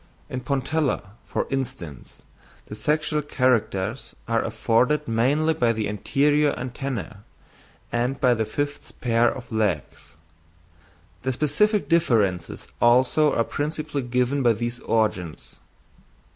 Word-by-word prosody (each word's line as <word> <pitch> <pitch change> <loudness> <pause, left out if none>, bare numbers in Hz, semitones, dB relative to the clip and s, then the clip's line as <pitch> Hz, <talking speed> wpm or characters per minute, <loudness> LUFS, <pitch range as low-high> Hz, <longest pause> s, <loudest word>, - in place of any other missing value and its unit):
"In 130 - -2
Pontella, 140 -4 -1
for - - -2
instance, 90 - -5 0.4
the - - -9
sexual 150 +5 0
characters 125 -6 0
are 115 0 +2
afforded 125 +6 +1
mainly 140 +8 +2
by 120 -6 +2
the 110 -1 -2
anterior 145 +8 +2
antennæ 125 -3 -5 0.7
and 125 +3 -1
by 125 -2 +4
the 110 -1 0
fifth 145 +6 -4
pair 120 -1 +3
of 125 -2 -9
legs: 105 -10 -2 1.1
the 130 - -1
specific 175 - +1
differences 105 - +1
also 130 +5 +4
are 115 - +3
principally 150 +2 -3
given 125 +3 0
by 120 -3 +4
these 120 +2 -4
organs." 105 -9 -1
125 Hz, 115 wpm, -24 LUFS, 115-145 Hz, 1.1 s, by